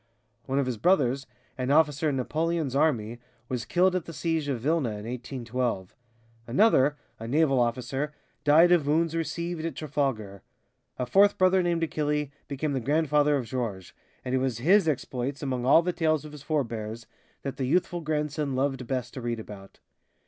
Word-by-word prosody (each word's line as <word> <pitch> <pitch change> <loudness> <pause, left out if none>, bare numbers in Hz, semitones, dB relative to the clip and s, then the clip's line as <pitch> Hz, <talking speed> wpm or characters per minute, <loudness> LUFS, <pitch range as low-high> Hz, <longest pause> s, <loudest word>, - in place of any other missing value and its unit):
One 135 +1 -1
of 140 - +2
his 125 -4 -3
brothers, 135 - +2 0.3
an 130 0 -1
officer 150 0 +3
in 140 - -1
Napoleon's 155 +1 -1
army, 120 -6 +1 0.3
was 125 -2 -3
killed 180 +8 +2
at 180 - -1
the 165 - -8
siege 160 -2 -1
of 135 -4 -1
Vilna 140 -3 0
in 105 - -8
1812; 120 -4 -3 0.5
another, 145 - +4 0.2
a 115 - -6
naval 140 0 +3
officer, 125 +4 -1 0.3
died 160 +4 +6
of 165 -5 +4
wounds 165 +2 +1
received 165 +1 -3
at 165 -4 -3
Trafalgar. 125 -10 -2 0.6
A 125 - -1
fourth 200 +10 +4
brother 185 0 +4
named 170 -1 0
Achille 150 -2 -1 0.2
became 145 +1 -2
the 135 - 0
grandfather 150 +2 +2
of 130 - -3
Georges, 110 -6 -4 0.3
and 125 - -2
it 130 - +3
was 130 -3 -1
his 175 - +4
exploits, 135 -1 -2
among 130 -2 -2
all 160 +5 +6
the 180 +1 -1
tales 155 -3 +1
of 150 - -9
his 150 -2 -10
forbears, 115 -7 -3 0.4
that 135 -1 -4
the 135 - -1
youthful 175 +4 0
grandson 150 -2 -2
loved 135 -2 -1
best 125 -2 -3
to 130 - -6
read 120 -1 -2
about. 100 -3 -11
140 Hz, 175 wpm, -27 LUFS, 125-160 Hz, 0.6 s, died